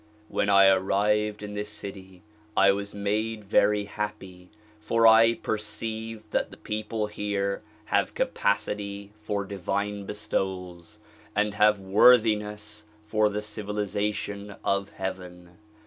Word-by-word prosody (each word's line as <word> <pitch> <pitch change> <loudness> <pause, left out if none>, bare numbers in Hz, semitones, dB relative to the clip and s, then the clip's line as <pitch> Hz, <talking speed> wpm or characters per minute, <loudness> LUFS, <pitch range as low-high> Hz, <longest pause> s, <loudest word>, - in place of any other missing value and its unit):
When 100 - 0
I 100 -1 +7
arrived 105 +2 +2
in 105 0 -6
this 105 0 -4
city 95 -3 -9 0.3
I 100 0 +7
was 100 0 -3
made 105 +2 -1
very 105 +1 +3
happy 100 -3 -6 0.3
for 115 +1 +2
I 115 +1 +7
perceived 110 0 -5
that - - 0
the - - -12
people 105 0 -3
here 100 -1 -2 0.2
have - - 0
capacity 100 0 -1
for 100 -2 -2
divine 100 +1 -3
bestowals 95 -1 -4 0.3
and 105 0 +1
have 105 0 +4
worthiness 105 0 +3 0.2
for 110 0 +2
the 105 0 -3
civilization 105 -1 -3
of 100 0 0
heaven. 90 -1 -7
105 Hz, 115 wpm, -27 LUFS, 100-105 Hz, 0.3 s, I